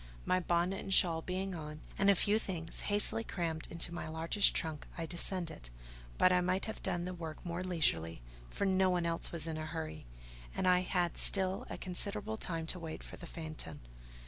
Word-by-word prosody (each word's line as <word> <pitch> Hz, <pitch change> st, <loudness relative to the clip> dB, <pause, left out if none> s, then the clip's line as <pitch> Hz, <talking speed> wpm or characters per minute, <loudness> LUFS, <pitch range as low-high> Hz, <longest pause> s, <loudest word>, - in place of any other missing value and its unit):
My 185 Hz, -, +3 dB
bonnet 175 Hz, +2 st, 0 dB
and -, -, -6 dB
shawl 170 Hz, -3 st, +5 dB
being 185 Hz, +2 st, -3 dB
on, 155 Hz, -2 st, -7 dB
and 195 Hz, +1 st, +3 dB
a 200 Hz, -, +7 dB
few 205 Hz, +4 st, +3 dB
things 170 Hz, -5 st, -4 dB
hastily 205 Hz, +2 st, +5 dB
crammed 165 Hz, -6 st, -2 dB
into 170 Hz, +1 st, +2 dB
my 170 Hz, -, -5 dB
largest 165 Hz, +6 st, +3 dB
trunk, 160 Hz, -3 st, -2 dB
I 165 Hz, -, -2 dB
descended. 170 Hz, -, -1 dB, 0.5 s
But 185 Hz, -, +5 dB
I 180 Hz, 0 st, +4 dB
might 185 Hz, +2 st, 0 dB
have 220 Hz, -, -6 dB
done 175 Hz, 0 st, -1 dB
the 185 Hz, -, -4 dB
work 165 Hz, -1 st, -7 dB
more 175 Hz, +1 st, -3 dB
leisurely, 85 Hz, -, +2 dB, 0.3 s
for 200 Hz, -, -2 dB
no 190 Hz, -1 st, +3 dB
one 175 Hz, -2 st, +1 dB
else 165 Hz, 0 st, -1 dB
was 165 Hz, -2 st, -1 dB
in 160 Hz, -1 st, -3 dB
a 155 Hz, -, -4 dB
hurry; 160 Hz, -, -6 dB, 0.5 s
and 185 Hz, -, 0 dB
I 180 Hz, 0 st, +6 dB
had 180 Hz, -2 st, 0 dB
still 190 Hz, -1 st, +1 dB
a -, -, -5 dB
considerable 205 Hz, +4 st, -3 dB
time 165 Hz, -5 st, -1 dB
to 180 Hz, +3 st, +2 dB
wait 160 Hz, -1 st, -6 dB
for -, -, -9 dB
the 175 Hz, -, -9 dB
phaeton. 155 Hz, -, -7 dB
175 Hz, 200 wpm, -34 LUFS, 160-185 Hz, 0.5 s, a